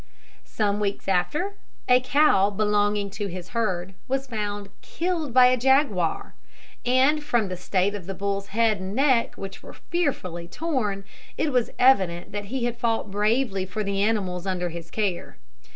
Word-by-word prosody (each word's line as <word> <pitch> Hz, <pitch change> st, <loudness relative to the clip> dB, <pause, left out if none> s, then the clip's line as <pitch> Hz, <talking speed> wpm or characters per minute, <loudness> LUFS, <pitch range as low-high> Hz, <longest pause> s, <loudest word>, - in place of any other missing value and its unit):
Some 205 Hz, -1 st, 0 dB
weeks 205 Hz, -1 st, -2 dB
after, 300 Hz, -, 0 dB, 0.3 s
a 250 Hz, 0 st, +6 dB
cow 255 Hz, -6 st, +4 dB
belonging 205 Hz, 0 st, +1 dB
to 205 Hz, 0 st, -4 dB
his 180 Hz, -1 st, -7 dB
herd 190 Hz, -5 st, -2 dB
was 270 Hz, +1 st, -1 dB
found 205 Hz, -4 st, -4 dB
killed 335 Hz, -5 st, -2 dB
by 250 Hz, +1 st, +7 dB
a 250 Hz, 0 st, +5 dB
jaguar, 245 Hz, -, +1 dB, 0.5 s
and 265 Hz, +5 st, +3 dB
from 235 Hz, -8 st, +1 dB
the 185 Hz, -, -3 dB
state 185 Hz, +2 st, 0 dB
of 195 Hz, -4 st, -7 dB
the 195 Hz, -, -4 dB
bull's 200 Hz, +1 st, -2 dB
head 220 Hz, -1 st, +1 dB
and 190 Hz, +2 st, -5 dB
neck, 260 Hz, -3 st, +2 dB
which 195 Hz, 0 st, -8 dB
were -, -, -11 dB
fearfully 185 Hz, -, -3 dB
torn, 215 Hz, -, -2 dB, 0.3 s
it 305 Hz, -, 0 dB
was 250 Hz, -3 st, +1 dB
evident 190 Hz, -10 st, +3 dB
that 205 Hz, 0 st, -4 dB
he 240 Hz, +3 st, -2 dB
had 240 Hz, -1 st, -2 dB
fought 225 Hz, -4 st, -1 dB
bravely 210 Hz, 0 st, +1 dB
for 190 Hz, +3 st, -4 dB
the 200 Hz, 0 st, -1 dB
animals 195 Hz, -4 st, 0 dB
under 180 Hz, -2 st, -1 dB
his 165 Hz, 0 st, -8 dB
care. 200 Hz, -, -2 dB
210 Hz, 165 wpm, -25 LUFS, 195-250 Hz, 0.5 s, by